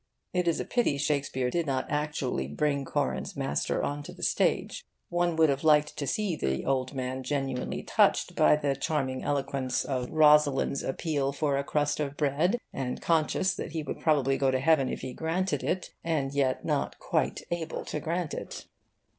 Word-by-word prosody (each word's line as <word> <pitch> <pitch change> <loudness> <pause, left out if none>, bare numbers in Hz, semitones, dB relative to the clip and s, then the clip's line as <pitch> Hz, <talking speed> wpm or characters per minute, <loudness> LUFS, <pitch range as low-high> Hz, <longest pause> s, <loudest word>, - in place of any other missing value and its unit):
It 180 -1 +1
is 165 - +2
a - - -2
pity 240 - +1
Shakespeare 140 -3 0
did 170 -2 -1
not 130 -1 0
actually 145 - -1
bring 140 - 0
Corin's 65 - -2
master 70 - -1
on 145 +1 -2
to 145 - -9
the - - -10
stage. - - +1 0.3
One 175 -1 +1
would 160 -1 +5
have 140 +1 0
liked 150 -1 +4
to 140 - -3
see 205 -1 0
the 65 - -2
old 130 0 0
man 130 0 -3
genuinely 135 -1 -2
touched - - +2
by - - +5
the 145 -2 0
charming 135 -2 -1
eloquence 135 -2 -1
of 130 -3 -2
Rosalind's 150 -3 +4
appeal 140 -1 -1
for 145 -1 0
a 140 - 0
crust 145 +1 0
of 145 -1 -3
bread, 155 - +2 0.2
and 130 -2 -3
conscious 170 +3 +1
that 185 - -6
he 160 -2 -2
would - - -5
probably 135 -4 +2
go 135 - +3
to 130 0 +1
heaven 140 -2 +3
if - - -4
he 130 - -5
granted 180 +6 -1
it, 185 - -2
and 145 -5 -1
yet 135 -2 0
not - - -1
quite - - -1
able 165 -2 -3
to 150 - -3
grant 165 +1 -2
it. - - -6
145 Hz, 185 wpm, -28 LUFS, 135-160 Hz, 0.3 s, would